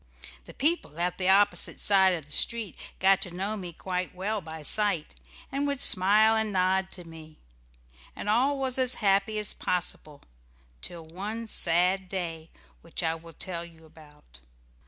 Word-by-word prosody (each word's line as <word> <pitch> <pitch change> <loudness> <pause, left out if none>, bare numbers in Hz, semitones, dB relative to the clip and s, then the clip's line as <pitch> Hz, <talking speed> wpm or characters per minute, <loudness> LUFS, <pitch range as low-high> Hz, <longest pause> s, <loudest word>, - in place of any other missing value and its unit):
The - - -13
people 290 - 0
at 175 +1 -2
the 185 0 0
opposite 200 +1 +3
side 190 -2 +4
of 160 -4 -8
the 145 - -17
street 230 +2 -1 0.2
got 195 0 +3
to - - -3
know 195 +5 -3
me 180 -4 -6
quite 180 +2 -4
well 205 +3 -2
by 160 -2 -9
sight, 200 -2 +2 0.4
and 280 +1 -2
would 280 -2 -1
smile 210 +3 +5
and 220 -1 -1
nod 190 0 +1
to 180 - -4
me. 160 -2 -14 0.8
And - - -7
all 255 +7 +2
was 265 -1 0
as 255 -1 +2
happy 200 +1 +1
as 210 -1 -2
possible 155 -4 -4 0.6
till 170 - -8
one 205 +8 -6
sad 180 0 +3
day 165 -4 -5 0.3
which 165 +1 -6
I 160 0 0
will 165 0 -12
tell 170 0 -5
you 165 -1 -15
about. 150 - -19
185 Hz, 165 wpm, -27 LUFS, 165-210 Hz, 0.8 s, smile